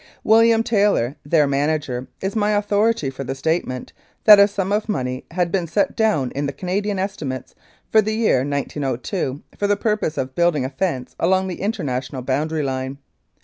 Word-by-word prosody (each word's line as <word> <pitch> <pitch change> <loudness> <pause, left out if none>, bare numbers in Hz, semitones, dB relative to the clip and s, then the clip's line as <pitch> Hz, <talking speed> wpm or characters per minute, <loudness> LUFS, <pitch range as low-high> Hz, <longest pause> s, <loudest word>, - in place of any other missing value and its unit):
William 225 +1 +5
Taylor, 205 - +2
their 150 0 +3
manager, 140 -2 -1
is 195 +2 -3
my 210 -1 +2
authority 205 -6 +1
for 135 +1 -6
the 135 +1 -4
statement 135 -3 -2 0.3
that 210 -2 +9
a 200 - +7
sum 200 -1 -3
of 210 +1 0
money 130 -9 -2
had 175 0 -1
been 180 -3 0
set 185 +5 0
down 205 - +1
in 145 +1 -2
the - - -2
Canadian 190 +7 -2
estimates 155 - -4 0.4
for 220 - +6
the 215 +1 -2
year 220 - +3
1902 140 - -3 0.2
for 205 - +1
the 205 0 +2
purpose 210 -7 -1
of 130 0 -3
building 170 -5 +2
a - - -2
fence 135 -5 -3
along 190 +2 +2
the 180 - -6
international 130 - -3
boundary 150 +4 -1
line. 130 0 -3
165 Hz, 175 wpm, -21 LUFS, 135-205 Hz, 0.4 s, that